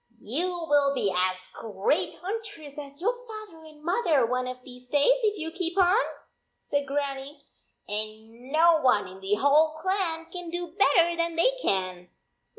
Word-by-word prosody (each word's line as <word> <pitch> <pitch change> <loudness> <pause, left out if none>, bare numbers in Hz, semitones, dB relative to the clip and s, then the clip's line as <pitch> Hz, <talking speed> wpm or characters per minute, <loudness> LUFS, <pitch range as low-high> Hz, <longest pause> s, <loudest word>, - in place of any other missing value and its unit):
" - - -26
You 285 - 0 0.2
will 285 -2 +3
be 200 -7 +1
as 185 0 0
great 220 - -1
hunters 400 -8 -6
as 280 0 -10
your 470 +6 +1
father 430 -7 -10
and 305 -1 -15
mother 335 - +2
one 250 +2 -1
of 255 0 -7
these 250 -1 -13
days 295 - +4
if 425 -2 +1
you 325 -2 -4
keep 350 +1 -2
on," 365 -1 +5 0.7
said 285 -1 -2
Grannie. 280 0 -4 0.4
"And 220 +4 -2
no 320 +1 +5
one 250 -8 +3
in 185 +1 -11
the 195 +2 +1
whole 300 +6 +3
clan 345 -2 0
can 355 -2 -6
do 350 0 -5
better 345 -4 +4
than 335 0 -1
they 340 +10 +4
can. 185 -2 -1
295 Hz, 165 wpm, -27 LUFS, 250-345 Hz, 0.7 s, on